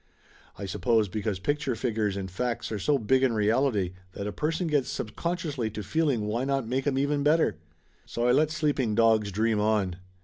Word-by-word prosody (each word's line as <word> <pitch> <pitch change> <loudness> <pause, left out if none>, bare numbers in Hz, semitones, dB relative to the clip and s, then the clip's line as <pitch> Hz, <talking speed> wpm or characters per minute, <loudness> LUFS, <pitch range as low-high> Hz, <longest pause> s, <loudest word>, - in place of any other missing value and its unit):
I 100 - -5
suppose 110 +2 +1
because 105 0 -2
pic 145 +10 -1
ture 135 -5 -2
figures 110 -4 -1
and 95 -2 -5
facts 120 +5 -2
are 105 - -2
so 145 +8 +2
big 130 +2 +2
in 130 -3 +3
reality 110 -3 +1 0.2
that 100 - -5
a 105 - -2
person 160 - -1
gets 150 -5 +1
subconsciously 150 - -3
to 105 0 -6
feeling 150 -6 +1
why 115 +4 -1
not 135 -2 0
make 130 +4 -1
'em 135 -2 +1
even 145 +1 +1
better? 150 - +2 0.5
So 120 +1 -1
I - - +5
let 150 +4 +3
sleeping 145 -8 0
dogs 110 -2 +3
dream 110 +2 +1
on. 105 -4 +1
115 Hz, 195 wpm, -27 LUFS, 105-140 Hz, 0.5 s, I